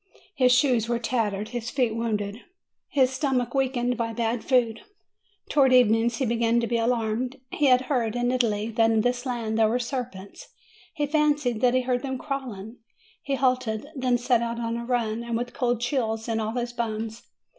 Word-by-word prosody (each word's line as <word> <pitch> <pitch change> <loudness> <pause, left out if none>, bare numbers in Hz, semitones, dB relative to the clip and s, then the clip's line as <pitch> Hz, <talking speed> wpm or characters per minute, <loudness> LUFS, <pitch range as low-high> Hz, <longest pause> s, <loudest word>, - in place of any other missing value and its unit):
His 255 -6 +3
shoes 245 -3 +3
were 235 - +1
tattered, 220 -3 -1
his 240 0 -4
feet 245 -4 0
wounded, 215 -1 -2 0.5
his 265 -4 +3
stomach 260 -3 -1
weakened 255 -2 0
by 230 -1 -2
bad 230 0 -1
food. 240 -4 +1 0.7
Towards 265 -3 +4
evening 225 -1 +4
he 240 +3 -2
began 235 0 +2
to 235 - 0
be 235 0 0
alarmed. 235 +2 -1
He 295 - +2
had 255 -1 +5
heard, 245 -4 -1
in 245 0 +1
Italy, 225 -3 0
that 225 0 +3
in 225 -1 +3
this 245 +2 -1
land 225 -3 -2
there 220 -1 +4
were 235 - +1
serpents; 240 -6 -6 0.5
he 295 -3 0
fancied 290 -6 +1
that 250 0 +3
he 255 - +3
heard 250 -1 -1
them 265 -2 -3
crawling; 250 -6 -6 0.4
he 275 - -2
halted, 255 -2 0
then 255 -2 +1
set 240 -1 +2
out 235 0 -3
on 230 0 -2
a 235 0 -4
run, 235 -2 -1
and 235 -1 -2
with 245 +1 -4
cold 245 -2 0
chills 230 -3 -1
in 225 -1 -1
all 220 0 -2
his 240 -1 -2
bones. 225 -1 -3
240 Hz, 190 wpm, -25 LUFS, 225-255 Hz, 0.7 s, had